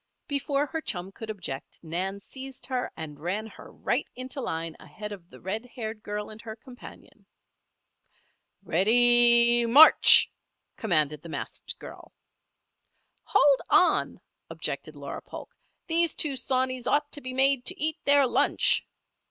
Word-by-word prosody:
Before 280 0 -1
her 320 +3 -5
chum 185 - -5
could 220 +2 -10
object, 180 -10 -7
Nan 185 +4 -3
seized 265 +5 -10
her 255 -1 -3
and 150 -2 -8
ran 185 +7 -3
her 220 - -13
right - - -2
into 255 +2 -6
line 165 -6 -4
ahead 210 0 -9
of 185 -4 -11
the - - -15
red 210 +5 -4
haired 220 -2 -6
girl 210 0 -6
and 215 +1 -11
her 220 -2 -8
companion. 245 +2 -15 1.4
"Ready! 235 +5 +4
March!" 290 +7 +8 0.4
commanded 155 -8 0
the 170 - -11
masked - - -6
girl. - - -12 1.1
"Hold 280 -2 +3
on!" 360 - +2 0.3
objected - - -5
Laura - - -7
Polk. - - -11 0.3
"These 335 -1 +1
two 290 -3 +1
sawneys 255 -1 -1
ought 290 0 0
to 290 - -4
be 255 - -6
made 270 -1 +3
to 370 +1 -4
eat 310 0 0
their 285 -1 +5
lunch." 245 - +2
235 Hz, 140 wpm, -26 LUFS, 195-270 Hz, 1.4 s, March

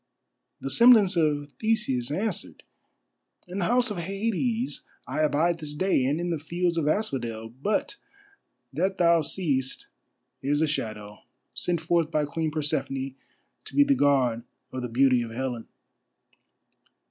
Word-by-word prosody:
The 135 - -4
semblance 225 -5 +6
of 145 -3 +1
Theseus 215 - 0
answered: 200 +9 -3 0.8
"In 180 +2 -5
the 180 - 0
House 245 +1 +2
of 205 - -4
Hades 225 +7 -2 0.2
I - - -4
abide 155 +3 +2
this 150 -2 -6
day, 170 -5 +2
and 145 +5 0
in 175 0 -2
the 165 - -1
fields 175 +3 -1
of 160 -3 0
asphodel. 120 - -2
But 210 - -1 0.8
that 190 0 0
thou 170 -1 +4
seest 140 -6 -1 0.6
is 145 +2 +1
a 160 - +2
shadow, 105 -7 -4 0.3
sent 175 -2 -1
forth 165 -1 +1
by 155 -2 +1
Queen 160 +2 -2
Persephone, 135 -3 -2 0.5
to - - -7
be 285 - +7
the 285 0 +3
guard 130 - +2 0.3
of 130 - -4
the 125 - -3
beauty 125 +1 +3
of 115 - -4
Helen." 120 -1 -4
155 Hz, 145 wpm, -26 LUFS, 135-185 Hz, 0.8 s, be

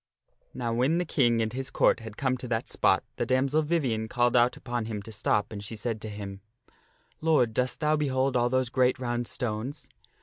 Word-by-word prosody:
Now 120 -2 -2
when 130 +8 +2
the 180 - 0
King 120 -7 +2
and 110 +1 -3
his 130 +1 -3
Court - - +3
had 110 -2 -9
come 130 -2 +1
to 125 - -7
that 115 -1 -1
spot - - +2
the - - 0
damsel 135 +4 +2
Vivien 135 -9 0
called 120 +2 +1
out 120 +1 +4
upon 120 -2 -3
him 105 -2 -4
to 110 - -10
stop 105 0 0
and 100 -1 -6
she 110 +3 -6
said 110 0 -3
to 110 - -5
him, 100 -2 -7 0.4
" - - -37
Lord, 150 -8 +3
dost 125 +5 -1
thou 150 0 +3
behold 135 -3 0
all 120 0 +3
those 130 -1 +1
great 125 0 +2
round 120 -1 -2
stones?" 125 +5 -4
120 Hz, 210 wpm, -28 LUFS, 110-130 Hz, 0.4 s, out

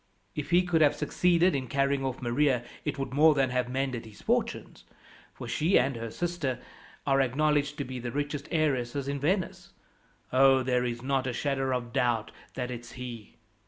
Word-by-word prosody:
If 150 - -4
he 175 +2 +5
could 175 -3 +1
have 145 -2 +5
succeeded 175 +4 +2
in 130 -2 -2
carrying 140 +1 +1
off 130 -1 -3
Maria 125 0 +2 0.2
it 145 -2 -2
would 135 -1 -4
more 155 +2 +6
than 135 -2 +2
have 125 -1 0
mended 130 -2 -2
his 105 -2 -14
fortunes, - - -2 0.5
for - - -9
she 170 +6 +2
and 130 +1 +2
her 115 0 -5
sister 165 -3 -2 0.5
are 135 -1 +3
acknowledged 145 +3 +1
to 140 - -2
be 130 -1 -6
the 120 0 -4
richest 145 +1 -3
heiresses 140 -4 0
in 140 0 -2
Venice. 175 +6 -1 0.6
Oh, 135 0 +5
there 125 -1 +1
is 120 0 -3
not 135 -1 0
a 125 - -2
shadow 135 -1 0
of 120 -2 -8
doubt 120 -3 +1 0.2
that 125 -1 -3
it's 120 -1 -8
he. 120 -4 -8
135 Hz, 185 wpm, -29 LUFS, 125-145 Hz, 0.6 s, more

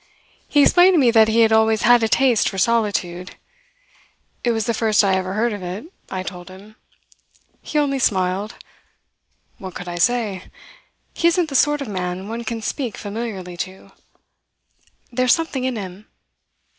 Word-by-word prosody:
He 290 -1 +4
explained 360 +3 +5
to - - +4
me 255 -6 +4
that 220 -1 +5
he 225 +1 +3
had 225 -1 +4
always 220 0 +3
had 240 0 +5
a 225 - +2
taste 250 -2 +3
for 195 - -8
solitude. 190 -5 -1 1.1
It 245 - +1
was 225 -2 -1
the 235 - 0
first 220 -1 +2
I 195 -1 +2
ever 190 0 -1
heard 225 +2 0
of 205 - -6
it, 195 - -7 0.2
I 185 -1 -4
told 180 -1 -8
him. 200 +3 -14 0.9
He - - -4
only 280 -2 +1
smiled. 190 -1 0 1.0
What 190 -2 -8
could 180 - -7
I 175 0 -5
say? 215 -3 0 0.7
He 340 - +1
isn't 340 -1 +1
the 275 - -6
sort 295 +2 +3
of 275 - -4
man 185 -1 -4
one 230 +2 -5
can 225 0 -4
speak 245 -1 -4
familiarly 200 -4 -6
to. 190 +1 -7 1.2
There's 255 0 +3
something 290 -6 -3
in 260 -1 -1
him. 195 0 -8
220 Hz, 170 wpm, -20 LUFS, 190-245 Hz, 1.2 s, explained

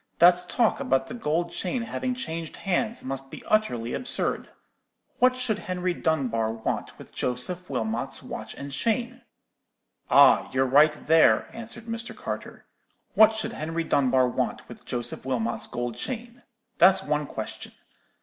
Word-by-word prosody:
'That 180 +1 +5
talk 235 -3 +2
about 135 0 +1
the 225 - -8
gold 170 -6 -1
chain 195 +7 -2
having 250 +2 -3
changed 165 -10 -5
hands 215 +4 -1
must 135 0 -5
be - - -10
utterly 120 - 0
absurd. 250 - -1 0.7
What 255 0 +4
should 235 -5 -1
Henry 180 -1 -2
Dunbar 125 -10 0
want 115 -1 -4
with - - -13
Joseph 175 +9 -3
Wilmot's 115 -3 -2
watch - - -7
and 140 0 -7
chain?' 235 - -1 0.9
"'Ah, - - +6
you're 130 0 +2
right 150 +3 +4
there,' 160 +1 +4
answered 230 0 -8
Mr. 230 0 -4
Carter. - - -6 0.5
'What 220 0 +6
should 220 +1 -2
Henry 165 -2 -3
Dunbar 130 -4 +3
want 125 - -2
with - - -12
Joseph 120 -1 -4
Wilmot's 120 -3 -2
gold 120 -1 -4
chain? 240 - -6 0.4
That's 190 +2 +6
one 150 0 -1
question. - - -7
170 Hz, 145 wpm, -26 LUFS, 130-225 Hz, 0.9 s, Ah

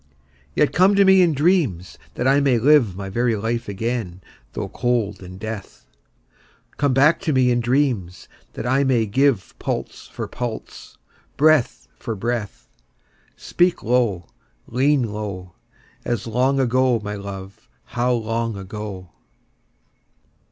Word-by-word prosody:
Yet 150 - +2
come 190 +3 +4
to 200 0 +5
me 190 0 +6
in 170 -4 +3
dreams, 140 - +1 0.2
that 125 - -1
I 135 +1 +4
may 135 -4 +3
live 125 -5 +4
My 100 0 -6
very 120 +4 0
life 115 +2 -3
again 100 -3 -3 0.3
though - - -4
cold 115 -5 -1
in 90 0 -10
death: 110 -1 -8 0.9
Come 145 -2 +2
back 145 +5 +4
to 170 -5 -1
me 130 -2 +3
in 120 - +2
dreams, 120 -8 -1 0.3
that - - -6
I 130 +3 +2
may 125 -4 +2
give 125 -2 +1
Pulse - - -4
for - - -6
pulse, 120 -3 -7 0.4
breath 145 - +3
for 115 - -4
breath: 110 0 -4 0.7
Speak 175 0 0
low, 115 -8 +1 0.4
lean 135 +3 +2
low, 95 -4 -6 0.5
As 120 -2 -2
long 130 +4 +1
ago, 130 -1 +2
my 105 0 -4
love, 100 -7 -9
how 120 +1 -1
long 115 -2 -1
ago! 95 -2 -7
120 Hz, 135 wpm, -21 LUFS, 100-135 Hz, 0.9 s, me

